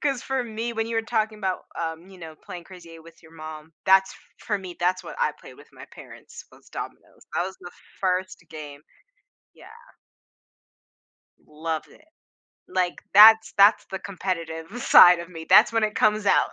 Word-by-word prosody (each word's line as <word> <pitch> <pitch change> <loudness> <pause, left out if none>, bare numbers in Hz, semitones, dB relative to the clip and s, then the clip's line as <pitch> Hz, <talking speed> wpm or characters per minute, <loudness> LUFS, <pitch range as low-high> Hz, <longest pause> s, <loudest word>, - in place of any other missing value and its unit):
'Cause, 275 -4 -1
for 265 -1 -2
me, 230 +1 -5
when 225 -1 -3
you 230 0 -4
were 225 - 0
talking 220 -2 -2
about, 190 -3 -3
um, 165 +1 -5
you 190 -1 -15
know, 160 -2 -10
playing 175 +2 -11
Crazy 180 -3 -14
Eight 165 -1 -13
with 165 0 -18
your 160 0 -18
mom, 155 0 -10
that's 190 0 +4
f - - -16 0.3
for 205 -2 -1
me, 185 -2 -10
that's 185 +1 0
what - - -9
I 485 - 0
played - - -14
with - - -18
my - - -13
parents, - - -13
was - - -20
dominoes. - - -10
That - - 0
was 190 0 -8
the 175 -1 -10 0.3
first 185 -2 -2
game, 150 -2 -10 0.7
yeah. - - -17 1.8
Love 155 +1 -5
it. 310 - -22 0.6
Like, 180 -1 -3
that's 220 +2 +8
that's 200 +2 +4
the 190 -1 -7
competitive 180 +2 -6
side 175 -1 +7
of 170 - -9
me. 165 -3 -10
That's 215 - +6
when 225 -1 +1
it 210 - -3
comes 215 -1 +1
out. - - +3
185 Hz, 185 wpm, -24 LUFS, 165-215 Hz, 1.8 s, that's